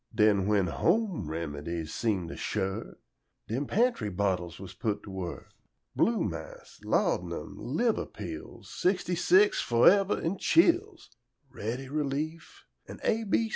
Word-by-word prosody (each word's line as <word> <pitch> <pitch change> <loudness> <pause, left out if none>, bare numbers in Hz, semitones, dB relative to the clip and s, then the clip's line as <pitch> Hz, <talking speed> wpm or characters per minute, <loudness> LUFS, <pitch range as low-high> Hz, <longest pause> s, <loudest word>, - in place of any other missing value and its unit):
Den 105 -3 +4
when 105 -3 +3
home 170 - 0
remedies 80 +1 -4
seem 100 -7 0
to - - -6
shirk, 95 -2 -3 0.5
Dem 130 +6 -2
pantry 225 - +1
bottles 90 -3 -1
was 95 -1 -9
put 105 0 -2
to 100 - -9
work: 95 -2 -6 0.4
Blue 230 -1 +2
mass, - - -7
laud'num, - - 0
liver 235 -2 0
pills, 340 +4 -8
"Sixty 180 -1 0
six, 185 +4 +4
fo' 120 0 +3
fever 195 +1 +5
an' 175 +4 -2
chills," 350 +3 +2 0.4
Ready 120 +6 -4
Relief, 150 +3 -3 0.2
an' - - -9
A. 225 0 +1
125 Hz, 130 wpm, -29 LUFS, -, 0.5 s, fever